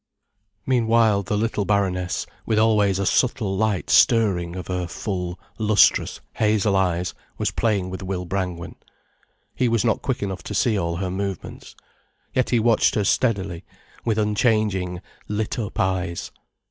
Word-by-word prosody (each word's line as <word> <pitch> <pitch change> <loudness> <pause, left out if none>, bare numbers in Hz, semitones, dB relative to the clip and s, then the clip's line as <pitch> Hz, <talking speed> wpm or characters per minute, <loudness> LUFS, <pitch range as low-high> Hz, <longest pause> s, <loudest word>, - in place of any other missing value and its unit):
Meanwhile 115 -4 +3
the 105 +1 -2
little 110 -1 0
baroness, 95 -3 0 0.2
with 110 - 0
always 105 -3 +3
a 100 - -1
subtle 110 0 +1
light 105 -2 0
stirring 95 -8 +3
of 90 - -5
her 90 -1 -3
full, 90 -1 -4 0.2
lustrous, 105 -1 +3 0.2
hazel 105 -2 +2
eyes, 90 -1 0 0.2
was - - 0
playing 100 -5 0
with 95 - -6
Will 95 -1 -3
Brangwen. 90 -2 -4 0.8
He 125 - +1
was 115 0 +1
not 110 - +1
quick 130 -6 -2
enough 95 -1 -4
to - - -5
see 115 -3 +2
all 85 -3 -1
her 90 +1 -3
movements. 95 -1 -5 0.6
Yet 130 - +1
he 120 - +3
watched 115 0 +3
her 105 - +1
steadily, 95 -5 0 0.4
with 110 -2 0
unchanging, 105 -4 +1 0.3
lit 105 +3 -2
up 105 -3 -4
eyes. 95 -2 -1
100 Hz, 145 wpm, -23 LUFS, 90-110 Hz, 0.8 s, Meanwhile